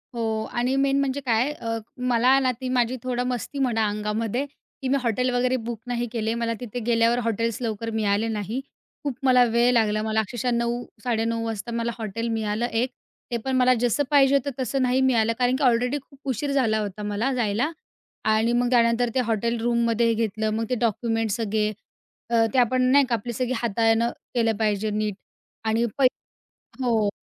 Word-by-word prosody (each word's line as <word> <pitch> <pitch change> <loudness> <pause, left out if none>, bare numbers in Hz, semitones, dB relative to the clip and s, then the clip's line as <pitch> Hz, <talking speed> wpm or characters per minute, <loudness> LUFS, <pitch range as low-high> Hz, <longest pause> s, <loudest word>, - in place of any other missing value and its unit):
हो. 220 -1 -1
आणि 245 +2 0
मेन 275 0 +2
म्हणजे 275 0 0
काय 240 +3 +2
अ, 230 -6 -4 0.2
मला 250 +1 +3
ना 260 -1 +2
ती 255 - -3
माझी 250 0 +1
थोडं 250 -1 -1
मस्ती 250 +3 -3
म्हणा 225 -4 +1
अंगामध्ये, 215 +5 -2 0.4
की 265 - -2
मी 275 - +3
हॉटेल 250 +1 0
वगैरे 250 +1 +2
बुक 235 -2 -4
नाही 240 0 -1
केले. 225 -1 -1
मला 230 0 -1
तिथे 245 0 -5
गेल्यावर 235 0 +3
हॉटेल्स 230 0 -1
लवकर 225 -1 -3
मिळाले 205 +1 +1
नाही, 220 +2 -3 0.4
खूप 285 -4 -2
मला 250 -1 +6
वेळ 235 +2 +4
लागला 215 -2 +2
मला 220 0 0
अक्षरशः 240 +4 -2
9-9:30 235 -1 -2
वाजता 225 +1 -4
मला 235 0 -1
हॉटेल 225 +1 -4
मिळालं 220 0 -1
एक, 240 +2 0 0.4
ते 235 - 0
पण 265 -1 0
मला 255 0 +5
जसं 245 +4 +1
पाहिजे 280 -1 +5
होतं 280 +1 0
तसं 260 +2 -1
नाही 255 +1 +2
मिळालं. 230 -4 +3
कारण 250 +1 +2
की 280 - -2
ऑलरेडी 250 +2 +2
खूप 275 0 -21
उशीर 270 +4 -1
झाला 230 -6 +2
होता, 210 0 -4
मला 210 +6 -1
जायला. 240 +5 0 0.5
आणि 220 +2 +2
मग 240 0 +2
त्यानंतर 235 0 +3
ते 260 - +3
हॉटेल 230 +1 0
रूममध्ये 235 -1 +2
हे 230 - +3
घेतलं. 220 -1 -1
मग 225 +1 -1
ते 250 - +1
डॉक्युमेंट्स 225 -1 0
सगळे 215 -1 0 0.6
अ, 225 -1 +5
ते 265 - +1
आपण 255 +1 +3
नाही 280 0 +6
का? 245 - 0
आपले 235 +2 -5
सगळे 255 +2 -1
हाताळणं 230 +1 +2 0.2
केलं 225 -2 +2
पाहिजे 215 -1 0
नीट 210 -1 -1 0.5
आणि 225 +2 +2
पै 270 - +4 0.8
हो 225 -4 +2
235 Hz, 185 wpm, -24 LUFS, 220-250 Hz, 0.8 s, मला